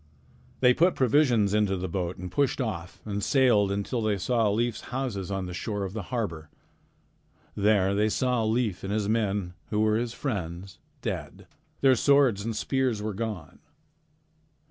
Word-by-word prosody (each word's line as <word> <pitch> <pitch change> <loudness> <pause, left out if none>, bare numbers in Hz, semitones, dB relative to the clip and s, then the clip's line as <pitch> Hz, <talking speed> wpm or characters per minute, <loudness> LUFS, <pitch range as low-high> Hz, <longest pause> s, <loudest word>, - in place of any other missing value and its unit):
They 125 -1 +6
put 175 +7 +3
provisions 120 -6 +3
into 105 -2 +2
the 90 +1 -3
boat 90 0 -3
and 90 0 -7
pushed 140 -1 +1
off 90 -9 -4
and 105 -1 -3
sailed 115 -6 +3
until 100 +5 -2
they 105 -2 +1
saw 115 +2 +1
Leif's 115 +3 -1
houses 120 -8 -3
on 95 -1 -2
the 90 - -6
shore 105 +3 -3
of 95 -1 -5
the 110 - -3
harbor. 85 - -3 1.0
There 100 -2 +2
they 105 +2 +2
saw 125 +1 +1
Leif 110 -3 0
and 95 - -3
the 100 - -2
men 100 -5 0 0.2
who 105 - 0
were 110 0 +3
his 120 0 -3
friends, 95 - -4 0.2
dead. 90 - -5 0.4
Their 135 -1 +6
swords 130 -6 +3
and 115 0 -3
spears 130 -1 0
were 105 0 -3
gone. 105 -8 -5
105 Hz, 165 wpm, -27 LUFS, 95-120 Hz, 1.0 s, They